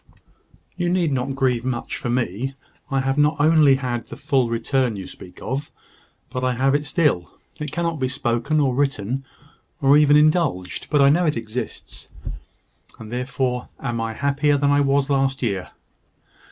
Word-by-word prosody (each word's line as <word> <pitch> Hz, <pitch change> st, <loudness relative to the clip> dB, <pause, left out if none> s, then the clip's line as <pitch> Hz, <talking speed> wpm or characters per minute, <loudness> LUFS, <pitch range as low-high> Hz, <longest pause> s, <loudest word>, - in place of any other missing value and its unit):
"You 175 Hz, -1 st, -1 dB
need 175 Hz, -3 st, +1 dB
not 135 Hz, +1 st, -1 dB
grieve 125 Hz, -3 st, +1 dB
much 125 Hz, -2 st, -3 dB
for -, -, -4 dB
me. 120 Hz, +2 st, -1 dB, 0.3 s
I 135 Hz, -1 st, +1 dB
have 135 Hz, +2 st, 0 dB
not 150 Hz, +2 st, +4 dB
only 150 Hz, -2 st, +5 dB
had 125 Hz, -3 st, -3 dB
the -, -, -8 dB
full 130 Hz, -4 st, +1 dB
return 120 Hz, +1 st, 0 dB
you 95 Hz, -2 st, -6 dB
speak 90 Hz, -, -12 dB
of, 140 Hz, +3 st, -3 dB, 0.6 s
but 125 Hz, -1 st, -3 dB
I 130 Hz, -1 st, +1 dB
have 135 Hz, +2 st, +2 dB
it 145 Hz, +1 st, +1 dB
still. 145 Hz, -, +1 dB, 0.3 s
It 150 Hz, -2 st, -4 dB
cannot 170 Hz, -1 st, -2 dB
be 130 Hz, -, +1 dB
spoken, 130 Hz, +2 st, 0 dB
or 135 Hz, -3 st, +2 dB
written, 135 Hz, -2 st, -1 dB, 0.6 s
or 140 Hz, 0 st, +5 dB
even 150 Hz, 0 st, +6 dB
indulged; 150 Hz, -, +1 dB
but 145 Hz, -2 st, +4 dB
I 140 Hz, -, +6 dB
know 175 Hz, +3 st, +2 dB
it 150 Hz, -, 0 dB
exists; 115 Hz, +1 st, -6 dB, 0.9 s
and 110 Hz, -1 st, -10 dB
therefore 125 Hz, 0 st, -2 dB
am 120 Hz, -3 st, -3 dB
I 115 Hz, 0 st, -3 dB
happier 140 Hz, +3 st, +1 dB
than 140 Hz, 0 st, +2 dB
I 145 Hz, 0 st, +4 dB
was 140 Hz, 0 st, +2 dB
last 135 Hz, -1 st, +1 dB
year. 100 Hz, -5 st, -2 dB
135 Hz, 170 wpm, -22 LUFS, 120-145 Hz, 0.9 s, even